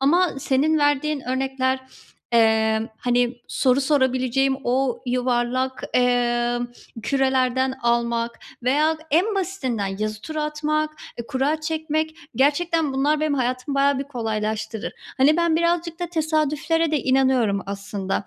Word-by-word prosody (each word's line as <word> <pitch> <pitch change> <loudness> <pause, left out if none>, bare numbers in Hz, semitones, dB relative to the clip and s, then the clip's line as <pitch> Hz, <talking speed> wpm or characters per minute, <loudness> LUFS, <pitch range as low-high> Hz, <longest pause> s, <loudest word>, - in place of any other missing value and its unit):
Ama 345 +7 +4
senin 280 +4 +2
verdiğin 290 0 +1
örnekler, 260 0 -1 0.5
eee, 220 -1 +3 0.2
hani, 245 0 +1
soru 255 +1 +2
sorabileceğim 265 -1 +2
o 255 0 0
yuvarlak, 250 +1 0
eee, 240 -1 +2 0.4
kürelerden 260 0 +1
almak 235 0 0 0.2
veya 300 +5 +2
en 365 +8 +2
basitinden 260 - -2
yazı 215 0 -3
tura 310 +5 -3
atmak, 305 0 -1 0.3
eee, 235 - -5
kura 285 +4 0
çekmek 315 0 -2 0.2
gerçekten 300 +3 +2
bunlar 290 +3 +1
benim 305 -1 +1
hayatımı 255 +1 -1
bayağı 275 0 +3
bir 275 - -3
kolaylaştırır. 220 -2 -3 0.3
Hani, 290 +4 +5
ben 340 -2 +2
birazcık 340 0 0
da 350 - -1
tesadüflere 315 0 0
de 305 - +2
inanıyorum 260 -6 +2
aslında. 200 0 -3
265 Hz, 120 wpm, -23 LUFS, 240-305 Hz, 0.5 s, Hani